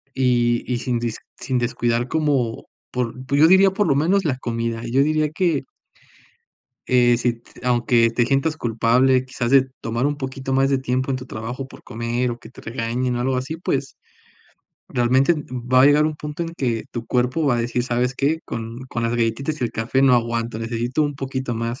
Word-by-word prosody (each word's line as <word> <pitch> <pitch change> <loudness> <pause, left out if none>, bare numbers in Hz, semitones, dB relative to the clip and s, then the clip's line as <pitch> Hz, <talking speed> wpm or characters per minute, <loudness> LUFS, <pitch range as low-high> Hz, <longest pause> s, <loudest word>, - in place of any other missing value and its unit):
Y 120 -2 +2
y 120 - 0
sin 120 0 -1
dis 115 -1 -3 0.2
sin 130 -2 -1
descuidar 120 0 0
como 140 -7 0 0.3
por 125 -2 -2
pues, 140 +2 +1
yo 155 - +8
diría 190 +2 +6
por 200 +1 0
lo 140 - +3
menos 175 +8 +2
la 140 -5 0
comida, 115 -2 -3
y 120 - -5
yo 135 +2 +4
diría 155 0 +1
que 165 -2 0 1.2
Eh, 120 -1 +4
si 120 0 +1
t - - -18
aunque 120 -1 +3
te 120 +1 +1
sientas 140 +4 +1
culpable, 125 +1 +2
quizás, 130 -2 -3
de 135 -1 +5
tomar 115 +3 -1
un 145 0 -1
poquito 135 -1 -5
más 135 +1 +3
de 135 - +2
tiempo 130 +1 -1
en 130 - 0
tu 130 0 -8
trabajo 120 +4 -6
por - - -14
comer, 120 +2 -2
o 120 - -5
que 110 - -13
te - - -14
regañen 120 +2 -2
o - - -2
algo 130 +1 0
así, 130 +5 -3
pues, 170 - -2 0.9
realmente, 130 +5 +3 0.2
va 130 0 +2
a - - +8
llegar 145 +1 +5
un 155 0 0
punto 150 +2 -5
en 165 - -4
que 120 -6 -1
tu 120 -1 -5
cuerpo 130 +5 +1
va 130 -3 +3
a - - 0
decir: 120 +1 -1
"¿Sabes 125 +1 0
qué?, 150 +5 0
con 115 +1 -6
con 115 - -3
las 115 0 0
galletitas 130 +7 -1
y - - +1
el 115 - -3
café 120 +4 0
no 135 -2 +6
aguanto, 115 -1 -1
necesito 120 +5 -1
un 145 -1 -1
poquito 130 -2 -3
más". 115 +2 -3
125 Hz, 210 wpm, -22 LUFS, 120-135 Hz, 1.2 s, yo